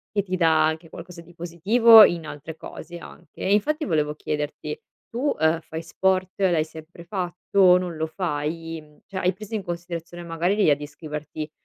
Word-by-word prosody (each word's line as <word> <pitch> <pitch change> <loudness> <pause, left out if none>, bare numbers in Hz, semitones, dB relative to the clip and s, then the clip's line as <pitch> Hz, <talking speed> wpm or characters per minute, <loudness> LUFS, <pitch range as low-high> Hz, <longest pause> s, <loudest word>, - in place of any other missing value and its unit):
che 200 - +3
ti 185 -1 -3
dà 160 -3 +4
anche 160 +1 -4
qualcosa 170 0 -10
di 175 +1 -18
positivo, 210 +7 +6
in 165 -4 +2
altre 155 +2 -8
cose 170 +1 -9
anche, - - -14
e 195 - 0
infatti 300 +10 +2
volevo 150 -4 0
chiederti: 150 0 -4 0.3
tu, 260 +5 -1
ehm, 160 +1 +3
fai 160 +1 -7
sport? 185 +2 0
L'hai 175 -5 +3
sempre 160 +2 -12
fatto? 180 0 +2
Non 175 -2 -4
lo 160 - -1
fai? 165 -1 -3
Mhmm, 150 -1 -19
cioè 195 -2 -7
hai 180 0 +1
preso 215 +3 -7
in 200 - -3
considerazione 175 0 -6
magari 170 +3 -1
l'idea 160 -9 +4
di 145 - -9
iscriverti, 150 +1 -7
170 Hz, 180 wpm, -24 LUFS, 160-185 Hz, 0.3 s, positivo